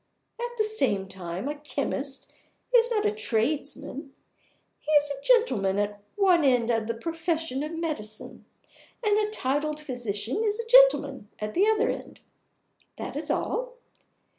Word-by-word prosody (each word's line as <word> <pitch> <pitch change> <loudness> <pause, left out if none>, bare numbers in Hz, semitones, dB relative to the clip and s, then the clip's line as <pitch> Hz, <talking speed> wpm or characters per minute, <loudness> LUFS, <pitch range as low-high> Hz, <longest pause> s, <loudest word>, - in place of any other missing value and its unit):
At 480 0 -4
the 435 - +3
same 315 - 0
time, 185 +4 -6
a 295 - -1
chemist 280 -2 -4 0.4
is 475 -1 +5
not 430 -3 0
a 420 - +3
tradesman. 285 - -2 0.6
He 305 - -4
is 290 -1 +5
a 275 -1 -5
gentleman 250 - +3
at 205 0 -2
one 370 -5 +4
end 245 -4 +3
of 225 -2 0
the 230 - -2
profession 325 0 -2
of 305 +2 -4
Medicine, 300 -11 -4 0.6
and 420 -1 +3
a 425 0 0
titled 300 -4 -1
physician 245 - -3
is 425 0 0
a 465 - -3
gentleman 460 - +5
at 210 0 -4
the 390 +4 +3
other 440 +2 +3
end. - - -8 0.8
That - - -6
is - - -3
all. - - -1
295 Hz, 150 wpm, -27 LUFS, -, 0.8 s, is